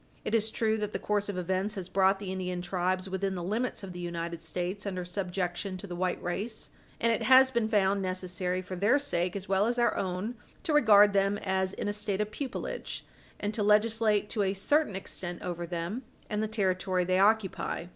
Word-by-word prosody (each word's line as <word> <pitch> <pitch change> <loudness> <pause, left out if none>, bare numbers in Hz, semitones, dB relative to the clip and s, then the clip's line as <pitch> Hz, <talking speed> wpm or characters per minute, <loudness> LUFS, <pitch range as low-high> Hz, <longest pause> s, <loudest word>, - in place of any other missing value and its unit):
It - - -2
is 220 -1 +2
true 220 0 +1
that 210 0 -3
the - - 0
course 205 -1 -1
of 200 - -3
events 190 +3 -1
has 190 -3 -5
brought 190 +1 +3
the 195 -1 -5
Indian 180 -1 -3
tribes 185 +1 -1
within 190 0 -2
the 175 - -4
limits 220 +5 -1
of 190 -2 -7
the 180 - -7
United 170 -1 -4
States 180 +5 -3
under 185 -2 -3
subjection 180 0 -3
to 185 - -8
the 180 -3 -6
white 180 0 -1
race, 210 +6 -4 0.3
and 230 - +3
it - - -1
has 260 0 +7
been 235 -3 +1
found 200 -2 +3
necessary, 185 0 -2
for 185 0 -6
their 205 +9 +4
sake 180 -11 -1
as 200 0 -5
well 195 +2 +3
as 240 +1 0
our 240 -2 +3
own, 185 +5 -2 0.3
to 330 -5 0
regard 210 -7 +7
them 195 +1 +2
as 190 -1 -1
in - - -4
a 205 - 0
state 205 -1 -2
of 210 0 -1
pupilage, 270 +3 -5 0.3
and 205 +1 -2
to 215 - -2
legislate 210 0 +3
to 215 - 0
a 195 0 +1
certain 290 +2 +2
extent 175 -2 -5
over 175 -1 -4
them 175 +7 -3 0.3
and 210 0 0
the 220 - 0
territory 185 -3 0
they 185 +1 +2
occupy. 205 -4 +2
195 Hz, 210 wpm, -30 LUFS, 185-210 Hz, 0.3 s, has